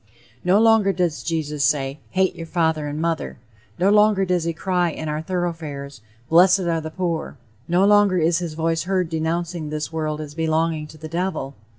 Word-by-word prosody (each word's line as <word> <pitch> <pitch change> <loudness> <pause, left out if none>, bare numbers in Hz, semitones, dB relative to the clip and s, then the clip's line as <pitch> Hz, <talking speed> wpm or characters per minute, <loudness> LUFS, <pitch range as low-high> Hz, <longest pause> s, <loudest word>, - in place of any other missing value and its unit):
No 185 +3 +4
longer 225 -3 +5
does 170 -8 -1
Jesus 150 -2 -2
say, 140 0 0
"hate 190 0 +1
your 165 - -7
father 160 -3 0
and 145 +1 -4
mother;" 165 -1 -2 0.4
no 185 +3 +3
longer 210 -2 +4
does 180 -2 0
he 170 - 0
cry 180 +1 0
in 155 0 -6
our 150 0 -2
great 160 - -7
thoroughfares, 155 - -4 0.3
"blessed 180 +4 +5
are 170 -2 0
the 160 - -5
poor;" 165 -2 -3 0.3
no 180 +3 +3
longer 205 -2 +4
is 170 +1 +2
his 170 -3 -5
voice 165 +1 -1
heard 185 -2 0
denouncing 165 0 -2
this 155 +1 -4
world 155 -1 -2
as 150 -1 -7
belonging 160 -1 0
to 155 - -14
the 155 +1 -8
devil. 165 -5 -3
165 Hz, 190 wpm, -22 LUFS, 155-180 Hz, 0.4 s, longer